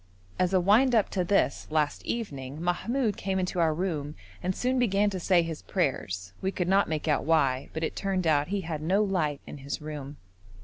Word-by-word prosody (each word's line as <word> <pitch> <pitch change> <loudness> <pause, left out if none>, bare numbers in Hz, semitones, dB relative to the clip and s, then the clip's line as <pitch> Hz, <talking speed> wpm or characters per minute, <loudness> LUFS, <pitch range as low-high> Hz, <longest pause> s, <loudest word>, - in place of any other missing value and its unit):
As 185 0 +2
a 190 - +4
wind 225 +8 +4
up 215 - +2
to 185 - 0
this 175 -5 +1
last 155 -2 0
evening 140 - -4
Mahmoud 210 +7 0
came 190 -1 -1
into 180 -1 -1
our 165 -2 +4
room 155 -3 -2 0.3
and 185 +1 -1
soon 255 +1 0
began 205 -3 +2
to 190 - -3
say 175 -1 +3
his 165 -2 -5
prayers; 95 - -2
we 190 - 0
could 180 -2 -2
not 195 0 +3
make 155 0 -2
out 150 - +2
why, 140 -4 +2
but 160 - -4
it - - -2
turned 190 -2 -1
out 150 -2 +3
he 200 +2 -1
had 160 -3 -4
no 190 +7 +2
light 165 -8 0
in 145 - -9
his 140 +1 -4
room. 150 -2 -7
175 Hz, 210 wpm, -28 LUFS, 150-195 Hz, 0.3 s, a